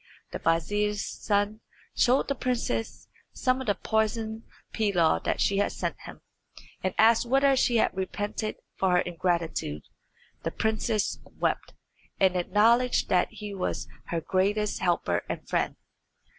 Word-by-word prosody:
The - - -4
vizier's 205 +6 0
son 205 +1 -1 0.4
showed 255 +2 +3
the 280 - +1
princess 245 -3 -2 0.3
some 255 0 +1
of 260 - -6
the 205 - +2
poisoned 220 0 -1 0.3
pilaw 185 -7 +2
that - - 0
she 200 - +2
had 205 - +1
sent - - -2
him, - - -10 0.6
and 185 0 -1
asked 230 +2 +5
whether 270 +2 +4
she 245 -2 +2
had 220 - +2
repented 205 +3 -3 0.3
of 190 - +3
her 180 - +4
ingratitude. 170 - -1 0.6
The - - -2
princess 220 -1 -1 0.2
wept, - - -1 0.4
and 190 -1 +4
acknowledged 225 +7 +3
that 180 -1 +3
he 210 -1 -7
was 190 -2 -3 0.2
her 170 -1 -2
greatest 205 +4 0
helper 170 - +1
and - - -5
friend. - - 0
210 Hz, 140 wpm, -27 LUFS, 185-225 Hz, 0.6 s, asked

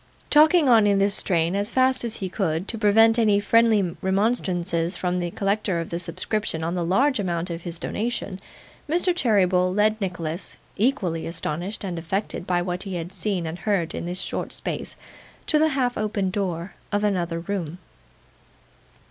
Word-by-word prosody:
Talking 310 +1 +6
on 225 -4 +6
in 200 -1 +3
this 200 +1 +3
strain, 170 -3 +1
as 205 +3 0
fast 260 0 +3
as 230 -1 -1
he 190 - -4
could, 180 -2 -2
to 230 - -2
prevent 225 +2 +5
any 210 -3 +4
friendly 210 -3 +3
remonstrances 190 -4 0
from 180 0 -1
the 175 -1 -2
collector 195 -1 -1
of 165 - -5
the 170 - -2
subscription 180 0 -2
on 165 +1 -1
the 175 -1 -1
large 255 +10 +2
amount 175 -2 -2
of 170 0 -5
his 170 0 -5
donation, 205 -2 -4 0.5
Mr. 350 +2 +2
Cheeryble 185 - +2
led 215 +3 +2
Nicholas, 170 -2 -3 0.2
equally 195 -8 0
astonished 170 +5 -4
and 180 -4 -3
affected 180 +2 -3
by 175 -1 +1
what 180 0 -3
he 195 -2 -3
had 175 +2 -5
seen 185 -1 -2
and 160 +2 -5
heard 195 -6 0
in - - -4
this 180 +1 -2
short - - -3
space, - - -4 0.5
to 305 - +4
the 315 - +4
half 255 -4 0
opened 205 -3 -1
door 185 -2 -3 0.2
of 205 0 0
another 175 -5 0
room. 175 -2 -4
195 Hz, 175 wpm, -24 LUFS, 175-215 Hz, 0.5 s, Talking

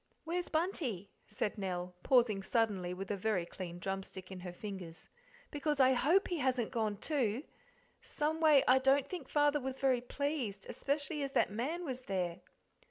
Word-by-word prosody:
"Where's 350 +2 -2
Bunty?", 290 - -1 0.2
said 210 0 -2
Nell, 180 -2 -3
pausing 235 -5 +4
suddenly 195 -4 0
with 190 +2 -5
a - - +1
very 195 -3 0
clean 175 -1 -7
drumstick 190 0 -5
in 190 - -6
her 180 0 -6
fingers, 180 -3 -7 0.4
"because 295 0 -1
I 260 0 +6
HOPE 325 +10 +3
he 350 - -1
hasn't 255 -4 +1
gone 220 -4 -1
too; 255 -2 0 0.6
someway 305 -2 +3
I 255 +1 +7
don't 270 +1 +3
think 325 -5 -6
Father 295 0 +3
was 265 0 -4
very 260 -3 +2
pleased, 250 -6 -3
especially 290 +2 -2
as 275 -1 -3
that - - +3
man 295 - -2
was 255 -3 -4
there." 180 -6 -2
250 Hz, 165 wpm, -34 LUFS, 195-290 Hz, 0.6 s, I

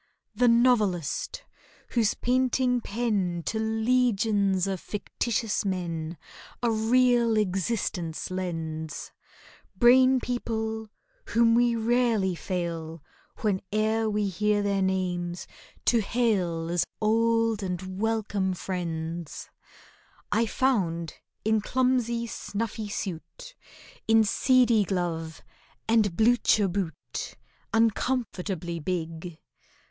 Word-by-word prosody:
The 250 - +3
novelist, 230 - +2 0.5
whose 225 -4 +1
painting 250 0 +1
pen 200 -7 -1
To 220 - -1
legions 220 -4 +2
of 195 -2 -2
fictitious 215 +2 -2
men 170 -4 -3 0.5
A 235 - +3
real 235 +1 +3
existence 185 -4 -1
lends, 160 -4 -4 0.7
Brain 255 +2 +6
people 220 -3 -3 0.4
whom 230 0 +3
we 240 0 +3
rarely 230 -4 +2
fail, 165 -3 -4 0.4
Whene'er 215 +2 0
we 210 -1 0
hear 205 +2 +1
their 200 -1 +1
names, 180 -2 -1 0.4
to 235 - +4
hail 190 -7 0
As 175 -1 +2 0.2
old 225 0 +2
and 185 0 -4
welcome 210 -4 0
friends; 170 -3 -5 0.8
I 225 +2 +2
found 180 - 0 0.3
in 220 0 +2
clumsy 245 -1 +1
snuffy 220 -1 -4
suit, 205 - -6 0.5
In 225 0 +5
seedy 240 0 +3
glove, 170 -4 -3 0.4
and 215 -6 +2
blucher 225 -2 +4
boot, 180 -3 -4 0.4
Uncomfortably 205 -6 0
big. 165 0 -4
210 Hz, 90 wpm, -27 LUFS, 180-230 Hz, 0.8 s, Brain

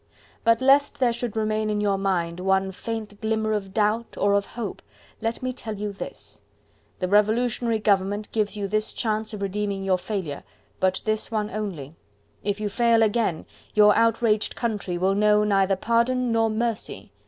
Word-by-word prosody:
But 230 +1 +3
lest 275 +2 +4
there 245 -3 +3
should 235 -2 -4
remain 215 0 0
in 210 0 0
your 200 -2 +1
mind 175 -3 -1
one 190 +1 +1
faint 215 +1 -6
glimmer 220 0 0
of 195 -2 -3
doubt 215 +3 0
or 200 0 +2
of 200 0 +1
hope, 225 -4 -6 0.4
let 225 +2 -2
me 255 0 -1
tell 220 -3 -6
you 205 0 -4
this. 195 - -8 0.6
The 185 - -2
Revolutionary 225 +3 +2
Government 205 0 0
gives 215 -1 -1
you 200 -1 -2
this 215 +2 0
chance 220 -1 -1
of 210 -2 -5
redeeming 200 0 -2
your 190 -1 +1
failure, 185 -8 -4 0.4
but 185 0 +1
this 215 0 -1
one 215 -2 -2
only; 180 -10 -5 0.5
if 205 +1 -1
you 210 - -1
fail 230 +2 +3
again, 215 -6 0 0.3
your 210 -1 +6
outraged 225 -1 +2
country 210 -6 -2
will 190 +2 +2
know 210 +1 +4
neither 195 -2 +2
pardon 235 +4 +1
nor 225 0 +2
mercy. 225 0 -3
210 Hz, 170 wpm, -25 LUFS, 200-225 Hz, 0.6 s, your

